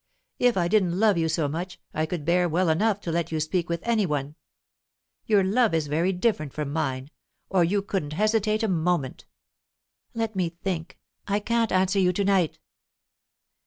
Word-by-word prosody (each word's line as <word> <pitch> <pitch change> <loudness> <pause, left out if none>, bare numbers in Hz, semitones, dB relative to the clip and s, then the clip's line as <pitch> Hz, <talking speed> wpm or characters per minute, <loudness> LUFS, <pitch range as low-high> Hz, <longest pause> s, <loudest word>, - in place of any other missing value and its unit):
If 245 -4 +3
I 175 -2 +2
didn't 185 -2 +2
love 210 -5 +4
you 160 0 +1
so 160 -2 0
much, 175 +5 -5
I 155 +1 -1
could 160 -3 -4
bear 175 +1 +2
well 170 +2 +1
enough 205 +6 +2
to 170 - -4
let 170 0 -1
you 160 - -1
speak 170 +3 -1
with 170 0 -2
any 225 -4 +1
one. 145 -1 -2 0.9
Your 205 -3 +4
love 215 0 +2
is 160 -2 0
very 160 +6 +1
different 180 - -1
from 150 -2 -4
mine, 135 -3 -2 0.4
or 185 -2 +4
you 195 +4 +1
couldn't 185 -7 -3
hesitate 215 +3 +1
a - - +2
moment." 170 -6 -1 0.9
"Let 225 -2 -2
me 180 -3 0
think! 175 0 -5 0.3
I 205 +1 +1
can't 230 +1 0
answer 190 +1 +2
you 180 -1 +3
to 200 - 0
night." 190 -5 +2
180 Hz, 180 wpm, -25 LUFS, 160-205 Hz, 0.9 s, love